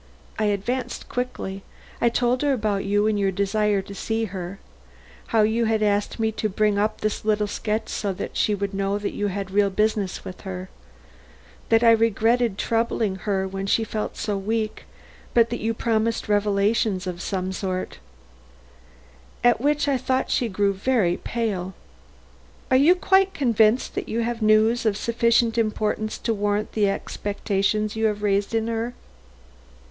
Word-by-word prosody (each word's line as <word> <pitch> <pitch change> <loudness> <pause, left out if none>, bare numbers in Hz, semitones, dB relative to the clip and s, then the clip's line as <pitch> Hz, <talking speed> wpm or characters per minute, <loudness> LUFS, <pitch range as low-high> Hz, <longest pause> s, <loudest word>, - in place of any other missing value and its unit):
I 215 - +2
advanced 210 +6 -2
quickly. 245 -6 -4 0.4
I 235 - +4
told 245 +2 +1
her 290 -1 +2
about 210 -5 -1
you 205 +1 +2
and 215 -1 +1
your 195 -1 +2
desire 200 +1 +1
to 200 - -10
see 225 +3 -2
her; 185 -1 -6 0.7
how 225 -3 +3
you 225 +2 +2
had 220 -1 +1
asked 205 +2 0
me 220 0 +1
to 215 0 -2
bring 210 +1 +1
her - - +2
up 215 +1 -1
this 215 -1 -2
little 210 -1 +1
sketch 210 +1 -2
so 200 - -2
that - - -6
she 210 - +2
would 200 0 -3
know 195 +1 0
that 205 0 -3
you 205 - -1
had 195 -1 -4
real 200 0 +3
business 210 -1 -1
with 185 - -8
her; 185 -1 -6 1.0
that 225 +1 +4
I 230 - +7
regretted 225 0 +2
troubling 225 -4 0
her 190 -2 +1
when 195 +1 -4
she 225 - +2
felt 215 -1 -4
so 205 -2 -2
weak, 215 +2 -2 0.5
but 230 -1 +4
that 240 - -2
you 225 +2 0
promised 225 0 0
revelations 205 -1 +1
or 180 -1 -4
some 185 0 -2
such 185 -1 -3
thing - - -15 1.4
at 240 -2 +4
which 295 +1 +1
I 275 -2 +2
thought 260 +1 0
she 240 - +1
grew 200 0 +1
very 195 -4 +1
pale. 195 -6 -3 1.0
Are - - +5
you 295 +7 +6
quite 385 +1 +3
convinced 230 -2 +2
that - - -4
you 230 +1 -1
have 235 0 -2
news 215 +2 +4
of 215 -3 +1
sufficient 235 0 +2
importance 215 -1 -1
to 230 - -1
warrant 205 0 -1
the 205 -2 +2
expectations 205 +1 -1
you 220 0 0
have 210 -1 -3
raised 200 +2 +1
in 225 -1 +1
her?" 230 +1 -3
215 Hz, 170 wpm, -24 LUFS, 200-230 Hz, 1.4 s, I